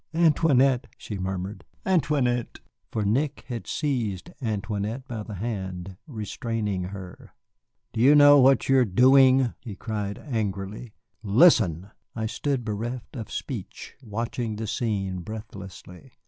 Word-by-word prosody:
"Antoinette," 145 -6 +3
she 105 -3 -6
murmured, 95 +2 -4 0.2
"Antoinette!" 145 -9 +1 0.3
For 110 -2 -1
Nick 135 +8 0
had 120 -2 -5
seized 115 - -2
Antoinette 110 +2 -3
by 115 -3 -5
the 105 0 -7
hand, 95 -3 -5
restraining 110 - -3
her. 95 -1 -10 0.6
"You 125 +6 +5
do - - +6
not 145 - +7
know 145 0 +8
what 135 -1 +5
you 135 0 +5
are - - +5
doing?" 130 +4 +5
he 105 -4 -8
cried 105 -2 -4
angrily. 105 - -4 0.3
"Listen!" 100 - +4 0.2
I 110 - -4
had 110 0 -2
stood 135 -5 -2
bereft 115 +4 -4
of 115 -4 -6
speech, 110 -9 -6
watching 115 0 -3
the 110 +1 -4
scene 100 -4 -2
breathlessly. 95 -3 -9
110 Hz, 135 wpm, -26 LUFS, 100-130 Hz, 0.6 s, know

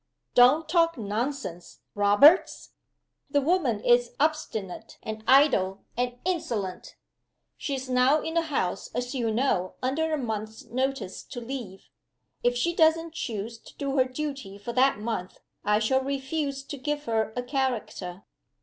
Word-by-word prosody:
"Don't 265 +6 +6
talk 330 -1 +3
nonsense, 215 -4 -4
Roberts! 205 - +5 0.6
The 285 - +3
woman 285 - +1
is 240 0 +3
obstinate 285 - -2
and 220 0 -6
idle 255 -9 +4
and 245 0 -1
insolent. 270 - -3 0.6
She 280 - -3
is 265 0 -5
now 255 +4 +4
in 320 +1 -4
the 335 - +3
house, 270 - -2
as 245 +2 -2
you 240 -4 0
know, 215 -6 0
under 315 +5 0
a 310 - +1
month's 220 -4 -4
notice 260 -5 -2
to 245 - -7
leave. 235 -6 -7 0.6
If 245 0 +2
she 340 +8 +1
doesn't 325 0 +3
choose 230 -5 -4
to - - -16
do 275 -1 -2
her 260 - +5
duty 260 -6 -5
for 235 +4 -6
that 265 +2 +4
month 210 -4 -4 0.2
I 210 0 +3
shall 250 +5 +2
refuse 275 +1 -2
to 285 - -7
give 295 +2 -2
her 220 -3 0
a 245 - -2
character. 225 -8 -3
255 Hz, 150 wpm, -27 LUFS, 220-285 Hz, 0.6 s, Don't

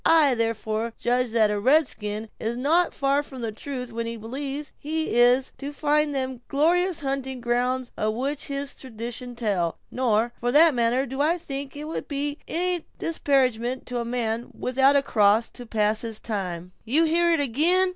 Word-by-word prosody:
I, 310 -5 +5
therefore, 225 -1 -1
judge 245 +1 +1
that 220 -2 +3
a 205 - -1
red 280 +7 +4
skin 210 0 -5
is 230 +2 -2
not 325 +7 +3
far 275 +1 +1
from 265 -3 -10
the 225 -2 -2
truth 250 +1 -6
when 230 0 -3
he 230 0 -4
believes 275 +6 -5
he 315 0 -2
is 245 +2 +4
to 280 +1 -5
find 295 0 +1
them 260 -2 -2
glorious 345 +4 +2
hunting 270 -2 -3
grounds 245 +1 0
of 215 0 -1
which 275 +4 -2
his 280 0 -3
traditions 240 0 -6
tell; 195 -8 0
nor, 235 -2 +1
for 245 0 0
that 315 +1 +7
matter, 240 +2 +2
do 265 +2 -3
I 325 +4 +2
think 275 -4 -6
it 295 - -6
would 315 +2 -5
be 285 0 -3
any 355 0 0
disparagement 260 -6 0
to 245 -1 -3
a - - -1
man 235 -1 -2
without 265 +2 +3
a 280 - +4
cross 215 -1 +3
to 245 -2 -11
pass 215 0 +1
his 225 -3 -3
time—" 180 -5 -4
"You 280 +9 +2
hear 340 +1 +3
it 330 - +3
again?" 320 +8 +3
255 Hz, 185 wpm, -25 LUFS, 230-290 Hz, -, that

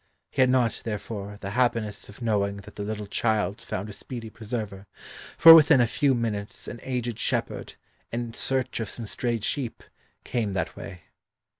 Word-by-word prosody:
He - - +1
had 130 - +5
not, 125 -3 +2
therefore, 105 -2 -5
the 100 - -4
happiness 115 -4 0
of 105 +4 -10
knowing 100 -3 +1
that 100 +1 -12
the - - -5
little 105 0 -3
child 105 -1 0
found 95 +3 -4
a 105 - -8
speedy 115 0 -7
preserver, 105 -4 -5 0.5
for 165 - +12
within 160 -3 +8
a 120 - +5
few 135 +3 +2
minutes 105 -3 -3
an 120 - -6
aged 120 -3 -3
shepherd, - - -2 0.4
in 120 0 -3
search 130 0 -1
of 110 -3 -3
some 115 - -5
strayed 115 0 -2
sheep, 130 -3 -3 0.4
came 110 -5 -1
that 95 - -2
way. 90 -3 -9
115 Hz, 170 wpm, -26 LUFS, 105-120 Hz, 0.5 s, for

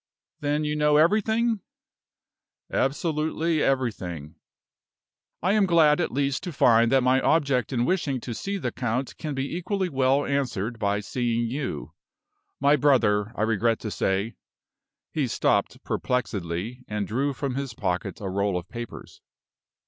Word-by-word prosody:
"Then 145 +1 0
you 150 0 -1
know 150 0 +3
everything?" 220 +7 +3 1.1
"Absolutely 155 +2 0
everything." 95 - -1 1.1
"I 185 - +3
am 210 -2 +3
glad 160 -2 +5
at - - -1
least 140 +1 0
to 175 - -5
find 115 -5 +4
that 135 -1 +4
my 130 +1 +3
object 140 -6 +2
in 120 -2 +1
wishing 150 -7 0
to 120 - -5
see 200 - -3
the - - -3
count 125 +1 -2
can 150 -3 -4
be 135 +4 -3
equally 185 +1 -1
well 135 0 +2
answered 125 -5 -2
by 100 0 0
seeing 120 +1 -1
you. 130 - -4 0.7
My 140 +2 +5
brother, 115 -8 +3
I 110 - -1
regret 115 +1 +2
to 110 - -4
say 100 +5 0 0.4
" - - -64
He 145 -4 0
stopped - - 0
perplexedly, 110 -1 -2
and 105 -1 -2
drew 135 +8 0
from 140 0 -3
his 135 -3 -4
pocket 90 +2 -2
a 100 - -5
roll 100 0 0
of 90 0 -6
papers. 120 -1 -8
130 Hz, 150 wpm, -26 LUFS, 110-150 Hz, 1.1 s, glad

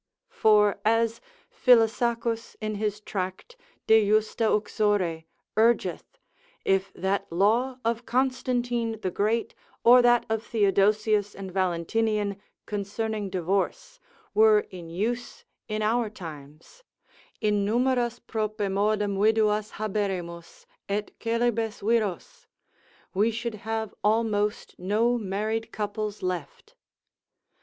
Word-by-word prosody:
For 210 -2 +4
as 225 +1 +1 0.3
Felisacus 230 -1 +2
in 215 -1 -3
his 210 0 -2
tract 190 - -5 0.3
de 220 0 +6
justa 215 +1 +2
uxore 205 -6 0 0.3
urgeth, 230 +2 +1 0.5
if 195 0 +1
that 190 -1 -2
law 225 +9 +2
of 230 +1 -1
Constantine 245 -3 0
the 185 - -2
Great, 220 +5 0 0.3
or 245 +1 +8
that 240 0 +4
of 220 0 -1
Theodosius 210 -1 +2
and 195 -1 -7
Valentinian, 200 +3 0 0.2
concerning 210 0 -3
divorce, 195 - -2 0.3
were 215 0 +6
in 175 -3 -9
use 235 +8 -3 0.2
in 215 0 -2
our 225 +1 +1
times, 160 - -11 0.6
innumeras 240 +4 +1
propemodum 210 -1 0
viduas 215 0 +2
haberemus, 195 - -4 0.2
et 205 +1 -2
coelibes 230 -1 -1
viros, 220 -6 -1 0.7
we 205 +4 +3
should 230 +1 -3 0.2
have 220 -2 -2
almost 210 -1 0
no 220 +6 +1
married 220 +3 -2
couples 210 -1 -4
left. 180 -6 -5
215 Hz, 100 wpm, -26 LUFS, 200-230 Hz, 0.7 s, or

